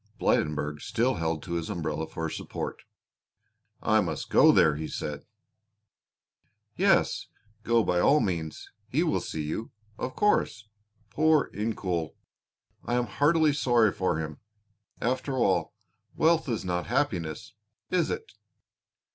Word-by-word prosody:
Blydenburg 75 -1 0
still 120 +3 +1
held 80 -1 -2
to 85 - -5
his 85 -1 -2
umbrella 80 -1 -3
for 80 +1 -4
support. - - -5 1.0
"I 110 -1 +4
must 90 - -4
go - - +7
there," 75 -2 +4
he 80 +1 -4
said. 75 -1 -5 1.5
"Yes, - - +2 0.3
go 115 +1 +3
by 90 -3 +1
all 145 +11 +5
means; 85 - -3 0.2
he - - +1
will - - +1
see 80 - -4
you, 80 +9 -4 0.3
of 130 - -4
course. 110 - +1 0.4
Poor 155 -2 +3
Incoul! 95 -6 -2 0.7
I 120 - -1
am 125 0 +1
heartily 155 +3 +3
sorry 120 -6 +3
for 95 -5 -1
him. 75 -2 -5 0.6
After 130 +3 -1
all, 105 -3 +1 0.4
wealth 160 -2 +3
is 110 -5 -2
not 90 -1 -2
happiness, 95 - -2 0.4
is 180 -2 +2
it?" 445 - -4
100 Hz, 130 wpm, -28 LUFS, 80-130 Hz, 1.5 s, go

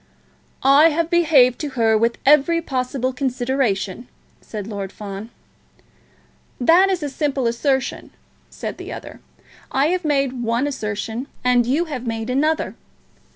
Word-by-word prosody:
"I 280 +4 +6
have 330 +2 -1
behaved 300 -8 +4
to 300 - -3
her 225 -1 +3
with 230 +2 +1
every 300 +4 +5
possible 260 -3 -2
consideration," 245 -5 -1 0.3
said 210 -3 -7
Lord 200 -3 -5
Fawn. 200 +1 -8 1.3
"That 340 +9 +5
is 365 -4 -1
a - - -1
simple 275 -2 -1
assertion," 265 +3 -1 0.4
said - - -6
the - - -7
other. - - -9 0.5
"I 275 +3 +2
have 365 0 -1
made 275 -4 0
one 235 +3 0
assertion, 225 -1 -4 0.2
and 245 -1 +3
you 295 +7 +1
have 260 -6 -6
made 225 +1 -3
another. 305 +5 0
260 Hz, 135 wpm, -21 LUFS, 230-295 Hz, 1.3 s, I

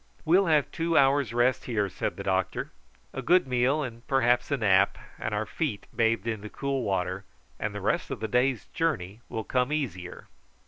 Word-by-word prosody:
"We'll 180 +4 +4
have 150 -3 +3
two 165 -2 0
hours' 135 -3 +4
rest 120 +2 +2
here," 105 -5 0
said 95 - -4
the - - -5
doctor, 95 -1 -1 0.4
"a - - -4
good 180 +2 +4
meal, 130 +4 +1
and 115 -3 -7
perhaps 125 -2 +2
a 140 - +1
nap, 95 -6 +3 0.2
and 110 - -3
our 105 +1 -1
feet 120 -3 -3
bathed 115 -2 +2
in 110 -3 -2
the 105 - -7
cool 140 +2 -2
water, 95 -3 -1 0.4
and - - -3
the - - -4
rest - - 0
of - - -4
the 110 - -2
day's 125 -1 +1
journey 110 - -2
will 110 - -3
come 125 +3 0
easier." 95 - -4
120 Hz, 190 wpm, -27 LUFS, 105-140 Hz, 0.4 s, We'll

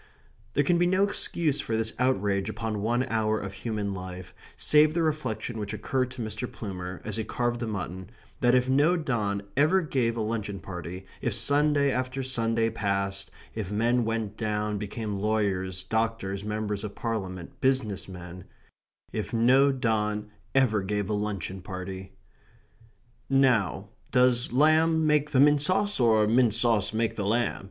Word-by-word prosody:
There 145 - +3
can 170 +3 +2
be 175 - +4
no 185 +2 +3
excuse 165 -7 0
for 115 -5 -2
this 110 0 -1
outrage 100 -6 +1
upon 110 -1 -3
one 120 +4 +1
hour 110 -3 0
of 95 -1 -6
human 105 -2 -3
life, 90 -1 -7 0.2
save 150 +1 +4
the 170 - +2
reflection 130 -7 -2
which 105 0 -4
occurred 130 +4 -1
to 130 -2 -6
Mr. 110 +3 -5
Plumer 90 -4 -6
as 110 0 -4
he 110 - -1
carved 120 +1 -1
the 120 - -3
mutton, 95 -2 -5 0.3
that 120 0 +4
if 125 0 +3
no 145 +7 +3
don 105 -10 -1
ever 155 +7 +4
gave 125 -7 0
a - - -1
luncheon 105 -2 -3
party, 90 0 -7 0.2
if - - -1
Sunday 145 -1 +2
after 130 +1 -2
Sunday 115 -3 0
passed, 100 -2 -2 0.2
if 105 -4 -4
men 120 +3 +2
went 110 -2 -2
down, 105 -1 -1
became 105 0 -4
lawyers, 95 -3 0
doctors, 110 -2 -1
members 105 -1 -3
of 105 -1 -6
Parliament, 95 -7 -5
business 130 -8 0
men 90 -1 -9 0.7
if - - -3
no 130 +5 +5
don 105 -4 -1 0.2
ever 120 -6 +3
gave 105 +1 -2
a - - +1
luncheon 100 -3 -3
party 95 0 -7 1.2
"Now, 120 -7 +2 0.2
does 125 -1 +3
lamb 155 +4 +4
make 150 -1 +3
the 135 - +2
mint 145 +1 +6
sauce, 195 +5 +1
or 110 -3 +4
mint 115 0 +3
sauce 115 -4 +2
make 110 +1 0
the 100 -2 -1
lamb?" 120 +3 +1
110 Hz, 160 wpm, -27 LUFS, 100-130 Hz, 1.2 s, mint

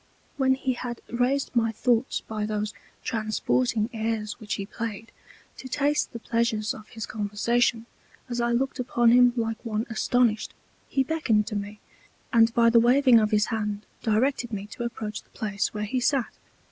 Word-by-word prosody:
When 265 -1 +3
he 260 -1 -1
had 240 -1 -5
raised 255 +3 0
my 225 -1 +3
Thoughts 240 +2 +1
by 215 -1 -4
those 210 0 -2 0.3
transporting 220 +1 0
Airs 220 -1 -2
which 215 -3 -3
he 195 - -4
played, 225 +1 -6 0.5
to 260 - -8
taste 290 +3 +1
the - - -6
Pleasures 230 -2 0
of 215 - -11
his 225 - -6
Conversation, 225 +2 0 0.4
as 240 -1 -2
I 235 0 +1
looked 265 +3 0
upon 240 -1 +3
him 245 0 +6
like 225 -2 -2
one 220 -1 -2
astonished, 225 -1 +1 0.3
he 270 - +2
beckoned 260 -8 +1
to 215 - -4
me, 205 +1 -5 0.5
and 230 0 +6
by 230 -1 +5
the 235 - +6
waving 250 0 +6
of 215 -1 +2
his 210 0 +3
Hand 210 -1 -2 0.2
directed 240 +2 +1
me 205 -2 -4
to 240 - -4
approach 220 -3 -5
the - - -32
Place 205 -1 -1
where 210 0 -3
he 255 +5 -1
sat. 255 0 +1
230 Hz, 170 wpm, -26 LUFS, 215-245 Hz, 0.5 s, him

